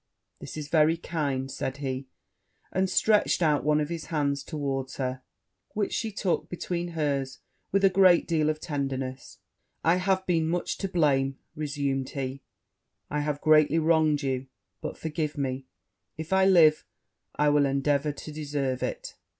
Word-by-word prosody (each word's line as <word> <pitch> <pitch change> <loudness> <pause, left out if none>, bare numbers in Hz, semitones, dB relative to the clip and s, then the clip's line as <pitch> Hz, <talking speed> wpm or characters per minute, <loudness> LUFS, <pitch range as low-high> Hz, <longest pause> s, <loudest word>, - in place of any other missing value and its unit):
'This - - -8
is 150 -2 -5
very 160 +1 +3
kind,' 140 -6 -2
said 130 +1 -4
he, 135 -1 -4 0.6
and 190 0 +1
stretched 210 -1 +3
out 150 -3 +2
one 150 +1 +3
of 150 0 -1
his 165 -3 -4
hands 145 -3 -1
towards 135 -4 -3
her, 130 -1 -3 0.5
which 205 -2 -1
she 225 - -1
took 195 -3 -1
between 175 -1 -4
hers 140 -3 -1 0.3
with 195 0 +3
a - - +9
great 185 -2 +5
deal 155 -3 +2
of 155 0 -1
tenderness: 135 -4 -4 0.5
'I 165 +2 +4
have 190 0 +1
been 165 -3 +1
much 175 +1 -2
to 195 - -1
blame,' 135 -7 +1 0.2
resumed 140 -3 -2
he; 135 -1 -4 0.7
'I 150 - 0
have 145 -1 -2
greatly 155 0 +5
wronged 155 -2 +3
you; 130 -1 -2 0.3
but - - -5
forgive 155 -2 -3
me 130 -1 -3 0.5
if 160 +3 -4
I 190 0 +5
live, 165 -5 +6 0.5
I 150 0 +3
will 145 -1 +4
endeavour 140 +2 +1
to 150 +1 -9
deserve 145 -4 -2
it.' - - -4
150 Hz, 160 wpm, -27 LUFS, 140-170 Hz, 0.7 s, a